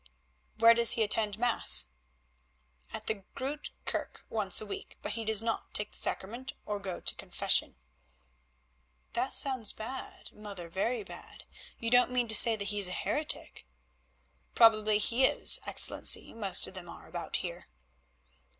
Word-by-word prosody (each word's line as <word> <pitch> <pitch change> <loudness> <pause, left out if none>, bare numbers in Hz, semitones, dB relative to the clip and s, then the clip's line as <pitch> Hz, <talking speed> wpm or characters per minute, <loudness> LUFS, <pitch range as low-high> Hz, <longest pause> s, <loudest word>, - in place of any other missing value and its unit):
"Where 230 +1 +6
does 235 0 +5
he 225 - 0
attend 210 -1 -2
Mass?" 70 - +5 1.0
"At 220 0 -7
the 220 -2 -4
Groote 275 +2 -6 0.2
Kerke - - -5
once 210 -4 +2
a 215 - -6
week, 205 - -9
but - - -4
he 230 - -5
does 220 0 +1
not 225 -1 -5
take 210 0 -2
the - - -9
Sacrament 240 +7 -4
or 210 -1 -4
go 190 -3 -7
to - - +2
confession." - - 0 1.4
"That 250 +3 -2
sounds 255 -6 +3
bad, 255 +4 -9
mother, 200 -5 -10
very 215 +6 -3
bad. - - -13 0.3
You 230 0 -5
don't 245 0 +4
mean 250 -1 -1
to 220 - +6
say 230 +1 +8
that 200 -1 -5
he 205 -1 -2
is 195 - +6
a 180 - -4
heretic?" 300 +10 -4 0.9
"Probably 215 -2 +4
he 235 +4 0
is, - - +5
Excellency; - - +1
most 200 -5 -2
of - - -7
them 180 -2 -10
are - - -13
about - - -6
here." - - -5
220 Hz, 160 wpm, -29 LUFS, 205-240 Hz, 1.4 s, say